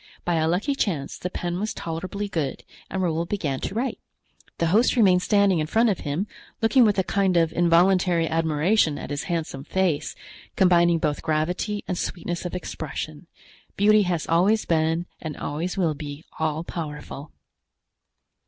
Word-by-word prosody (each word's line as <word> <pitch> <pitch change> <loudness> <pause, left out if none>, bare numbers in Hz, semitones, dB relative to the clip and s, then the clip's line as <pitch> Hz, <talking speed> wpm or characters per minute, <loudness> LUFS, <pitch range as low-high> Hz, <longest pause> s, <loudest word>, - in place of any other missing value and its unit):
By 175 -1 +1
a 160 0 +2
lucky 190 - +1
chance 165 - -2
the 180 - -4
pen 175 0 -3
was 215 +2 -3
tolerably 185 +5 -4
good 160 -8 -3 0.3
and 190 0 -2
Raoul 170 -1 0
began 150 -10 -2
to - - -4
write. 255 +4 -2 0.6
The 170 - +1
host 230 +4 +4
remained 190 -6 +5
standing 200 -1 +3
in 155 - -1
front 225 +7 +3
of 195 - 0
him, 150 +6 -2 0.3
looking 240 +2 +5
with 210 -2 +2
a 190 - +3
kind 190 -1 +1
of 165 -1 +2
involuntary 175 0 +3
admiration 160 +1 +2
at - - -7
his 145 0 -3
handsome 165 -7 -3
face, 180 -2 -1 0.4
combining 175 -3 +4
both 150 -2 -1
gravity 175 +7 -1
and 180 -2 -2
sweetness 175 0 -4
of 180 - -4
expression. 160 -1 -6 0.5
Beauty 210 +1 +5
has 175 -5 -1
always 190 +7 +3
been 165 +1 +1 0.2
and 155 -3 -5
always 165 +6 -3
will 170 -5 +2
be 145 +1 -8
all 160 0 -1
powerful. 150 -3 -7
175 Hz, 160 wpm, -24 LUFS, 160-195 Hz, 0.6 s, remained